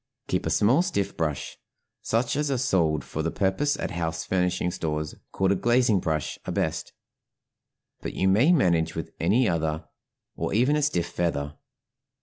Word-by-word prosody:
Keep - - 0
a - - +1
small 105 - +4
stiff 175 - -1
brush; 75 -4 -3 0.4
such 115 +3 0
as 150 0 0
are 135 - +1
sold 85 - +1
for 80 - -4
the 80 - 0
purpose 105 - 0
at - - -3
house 80 -2 -3
furnishing 90 -1 0
stores, 75 -2 -3 0.2
called 95 0 +1
a - - +3
glazing 120 0 +3
brush, 80 -4 -2
are - - -1
best; - - -2 1.1
but - - -5
you 95 - +1
may 110 - +5
manage 85 - +2
with 80 - -5
any 120 +2 +3
other 80 -3 -1 0.5
or - - -2
even 130 +7 +3
a 150 - +1
stiff 140 - +1
feather. 80 -5 -2
90 Hz, 165 wpm, -26 LUFS, 80-120 Hz, 1.1 s, may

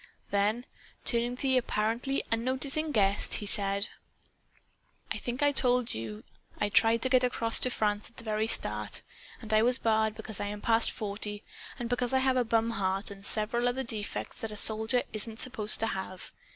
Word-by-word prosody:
Then, 210 +4 +1 0.4
turning 240 0 +4
to - - -4
the 260 -1 +3
apparently 235 +4 -1
unnoticing 265 +6 0
guest, 200 -4 +2
he 210 - -2
said 200 0 +1 1.2
"I - - -2
think 245 +3 -3
I 290 - +5
told 250 -3 +3
you 110 -1 -6 0.4
I 205 - +1
tried 225 +2 +4
to 260 - +2
get 255 -1 +4
across 230 -2 +2
to 255 - +2
France 210 -3 -1
at 235 - -28
the 235 - -8
very 215 0 -1
start - - -2 0.4
and 220 -2 -5
I 215 - +5
was 245 +2 +3
barred 220 -2 +1
because 220 -2 -8
I 205 - -2
am 205 0 -5
past 225 +1 +3
forty 205 0 -4 0.3
and 240 -3 -4
because 245 +1 0
I - - +4
have 260 0 +2
a 250 - +3
bum 230 0 +1
heart 195 -1 -1
and 195 -1 -11
several 230 +4 +3
other 260 +2 -2
defects 220 -4 -5
that 225 - -3
a 210 - -7
soldier 220 +4 0
isn't 220 +1 -4
supposed 220 -5 +1
to - - +2
have. 190 -3 -5
225 Hz, 190 wpm, -29 LUFS, 210-245 Hz, 1.2 s, I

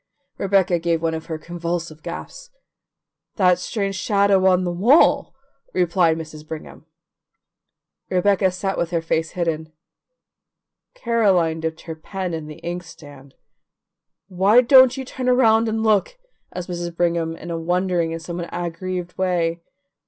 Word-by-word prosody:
Rebecca 190 -3 +2
gave 165 0 0
one 165 0 -1
of 160 0 -6
her 160 -2 -4
convulsive 170 -1 -5
gasps. - - -8 0.9
"That 180 -3 +3
strange 195 0 -2
shadow 200 0 +2
on 185 -1 +3
the 175 - -1
wall," 235 - +4 0.4
replied 170 -2 +2
Mrs. 155 -1 -8
Brigham. 160 0 -9 1.2
Rebecca 190 +1 +2
sat 190 +1 -3
with 170 - -1
her 170 -1 -1
face 160 0 -1
hidden: 160 -3 -2 1.2
Caroline 195 - +1
dipped 160 0 -4
her 165 - -7
pen 185 +2 -5
in 160 -2 -5
the 150 - -9
inkstand. 160 -6 -9 0.9
"Why 200 +5 +4
don't 260 +1 +6
you 265 - -5
turn 255 0 -3
around 225 -3 +4
and 220 0 -1
look?" 215 - +1 0.3
asked 180 -1 -6
Mrs. 175 -1 -4
Brigham 170 -2 0
in 170 +1 -8
a 165 - -3
wondering 175 0 0
and 165 - -4
somewhat 170 +1 -5
aggrieved 175 +1 -4
way. 175 -2 0
175 Hz, 140 wpm, -21 LUFS, 165-195 Hz, 1.2 s, don't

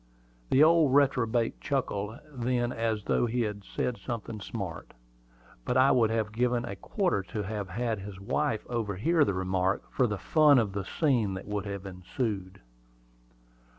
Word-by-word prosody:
The 135 - +6
old 160 -4 +5
reprobate 125 -5 +2
chuckled 110 -6 -2 0.2
then 120 -1 0
as 115 -3 -1
though 120 - +1
he 120 +2 0
had 105 -2 -3
said 120 +4 -3
something 115 -3 -5
smart; 95 -6 -6 0.7
but 125 - 0
I 130 +1 +6
would 115 -4 +4
have 110 -2 -1
given 120 +1 0
a 100 - -5
quarter 180 - 0
to 95 +3 -5
have 100 -1 -4
had 110 +2 -2
his 100 0 -8
wife 115 +2 -1
overhear 120 - +1
the 100 -9 0
remark, 95 0 0
for 125 - +2
the 105 -2 -2
fun 150 +4 +5
of 110 -5 +1
the 100 -1 -3
scene 120 - +1
that 95 - -7
would 105 -1 -3
have 100 -1 -5
ensued. 95 +1 -4
110 Hz, 160 wpm, -29 LUFS, 100-125 Hz, 0.7 s, The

